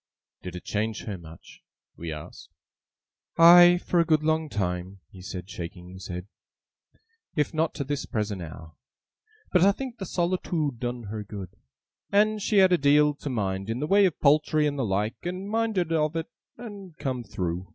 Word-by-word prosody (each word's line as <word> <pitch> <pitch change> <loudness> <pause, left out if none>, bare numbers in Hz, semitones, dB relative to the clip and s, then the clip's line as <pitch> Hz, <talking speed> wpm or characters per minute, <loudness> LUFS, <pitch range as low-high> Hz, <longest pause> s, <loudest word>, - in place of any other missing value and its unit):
'Did 90 -1 -7
it 90 - -7
change 110 +1 -2
her 105 - -4
much?' 85 -2 -13 0.3
we 85 -1 -6
asked. 75 -1 -9 0.9
'Aye, 175 +1 +9
for 175 - +2
a - - +6
good 155 -2 +2
long 155 0 +1
time,' 90 -2 -3
he 95 - -12
said, 90 -2 -7
shaking 90 -1 -8
his 95 +1 -9
head; 90 0 -5 1.1
'if 150 0 0
not 160 +1 0
to 145 - -2
this 145 +1 -3
present 105 -3 -2
hour. 80 0 -9 0.8
But 180 - +4
I 195 +2 +6
think 250 +3 -7
the 190 - -4
solitoode 170 -7 -1
done 120 -1 -3
her 105 0 -5
good. 100 -3 -8 0.6
And 215 +1 +3
she 210 - +1
had 190 -1 +6
a 180 - +3
deal 145 +1 +4
to 145 0 -7
mind 95 -4 -2
in 115 +2 -2
the 150 - -1
way 195 +4 +5
of 175 - -5
poultry 150 +1 +3
and 145 -1 -1
the 130 - +1
like, 105 +2 -1
and 185 +3 -4
minded 215 -6 0
of 155 0 +1
it, 165 +7 -3 0.3
and 200 -8 -10
come 130 -4 -3
through. 90 -3 -4
145 Hz, 185 wpm, -26 LUFS, -, 1.1 s, Aye